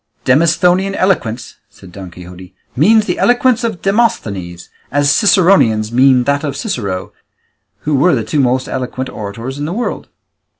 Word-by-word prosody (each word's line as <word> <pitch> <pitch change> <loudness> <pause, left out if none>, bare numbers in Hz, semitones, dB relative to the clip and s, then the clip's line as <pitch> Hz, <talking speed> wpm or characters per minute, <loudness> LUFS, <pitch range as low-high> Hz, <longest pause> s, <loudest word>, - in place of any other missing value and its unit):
"Demosthenian 175 +7 +2
eloquence," 130 - -1
said 95 - -16
Don 95 0 -9
Quixote, 90 +1 -13 0.2
"means 215 - +4
the - - -3
eloquence 245 -1 +2
of 220 -7 -4
Demosthenes, 100 - -2 0.2
as 145 0 +2
Ciceronian 180 - +3
means 130 0 +4
that 140 +1 0
of 140 -2 -4
Cicero, 100 - -4 0.7
who 150 - -2
were 145 +4 +3
the 115 - -2
two 110 +8 -2
most 130 0 +1
eloquent 130 0 -4
orators 115 +6 -7
in 145 - -3
the 165 - -4
world." 240 +4 -4
140 Hz, 145 wpm, -15 LUFS, -, 0.7 s, means